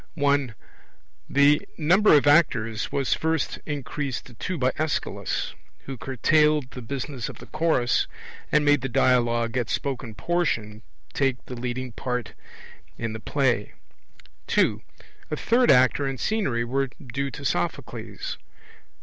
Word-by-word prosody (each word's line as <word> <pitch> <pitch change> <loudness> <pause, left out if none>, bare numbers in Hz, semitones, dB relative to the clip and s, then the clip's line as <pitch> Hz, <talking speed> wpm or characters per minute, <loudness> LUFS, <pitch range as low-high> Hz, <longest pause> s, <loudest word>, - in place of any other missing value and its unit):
(1) 140 -5 +1 0.7
The 140 +1 +5 0.2
number 180 +4 +5
of 145 - +4
actors 120 -8 +3
was 140 -2 +1
first 160 0 -1
increased 145 -2 -3
to 125 - -13
two 180 +9 -4
by 130 -2 +2
Aeschylus, 155 -1 -2 0.3
who 135 - -5
curtailed 150 +3 +2
the 125 - -8
business 130 0 -4
of - - -9
the - - -11
Chorus, 155 -6 +1 0.4
and 150 0 +3
made 145 -2 +4
the 135 - -3
dialogue, 120 -1 +2
or 125 -2 +1
spoken 130 -5 -3
portion, 115 -12 -1 0.3
take 135 -2 0
the - - -8
leading 125 +1 -4
part 125 -1 -4 0.6
in 115 -2 -3
the 110 - -5
play. 125 -3 0 0.7
(2) - - +2 0.5
A 150 - -1
third 240 +9 +2
actor 130 +2 +5
and 135 -2 -4
scenery 190 - 0
were 135 +3 0
due 140 +2 -4
to 140 +3 -8
Sophocles. 90 - -3
135 Hz, 135 wpm, -25 LUFS, 120-150 Hz, 0.7 s, The